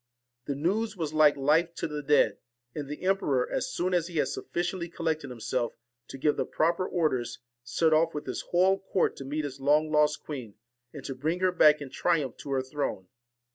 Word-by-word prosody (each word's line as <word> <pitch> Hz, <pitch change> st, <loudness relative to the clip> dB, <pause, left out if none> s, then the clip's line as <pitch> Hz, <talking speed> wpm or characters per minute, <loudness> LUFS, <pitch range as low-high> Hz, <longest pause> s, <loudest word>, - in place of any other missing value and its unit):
The 140 Hz, -, -2 dB
news 200 Hz, +8 st, -1 dB
was 155 Hz, -3 st, -3 dB
like 155 Hz, -1 st, +5 dB
TINE 140 Hz, -, -8 dB
AND -, -, -4 dB
life 165 Hz, +3 st, +3 dB
to -, -, -2 dB
the 150 Hz, -1 st, -4 dB
dead; 145 Hz, +1 st, +3 dB, 0.3 s
and 145 Hz, -2 st, -5 dB
the 150 Hz, -, -6 dB
emperor, 150 Hz, -10 st, +1 dB
as -, -, -2 dB
soon 180 Hz, +1 st, -1 dB
as 170 Hz, -2 st, +1 dB
he 175 Hz, -, -10 dB
ORSON 155 Hz, -, +2 dB
had -, -, -1 dB, 0.2 s
sufficiently 175 Hz, 0 st, -2 dB
collected 160 Hz, -4 st, -2 dB
himself 120 Hz, 0 st, -2 dB, 0.3 s
to -, -, -8 dB
give 150 Hz, +2 st, +1 dB
the -, -, 0 dB
proper 170 Hz, +3 st, +1 dB
orders, 150 Hz, -9 st, -1 dB, 0.3 s
set 155 Hz, +7 st, +2 dB
off 165 Hz, +1 st, +3 dB
with 150 Hz, -, -4 dB
his -, -, -3 dB
whole 190 Hz, +2 st, +3 dB
court 190 Hz, -1 st, 0 dB
to 135 Hz, -, -7 dB
meet 150 Hz, +3 st, -2 dB
his 140 Hz, -1 st, -6 dB
long 150 Hz, +3 st, +3 dB
lost 150 Hz, 0 st, +2 dB
queen, 125 Hz, -9 st, -7 dB, 0.4 s
and 140 Hz, -, -9 dB
to 135 Hz, -, -3 dB
bring 155 Hz, +7 st, -2 dB
her 185 Hz, 0 st, +3 dB
back 150 Hz, -4 st, +5 dB
in 135 Hz, -2 st, -7 dB
triumph 155 Hz, -8 st, 0 dB
to -, -, -9 dB
her 135 Hz, -1 st, 0 dB
throne. 130 Hz, -9 st, -4 dB
150 Hz, 215 wpm, -28 LUFS, 140-170 Hz, 0.4 s, like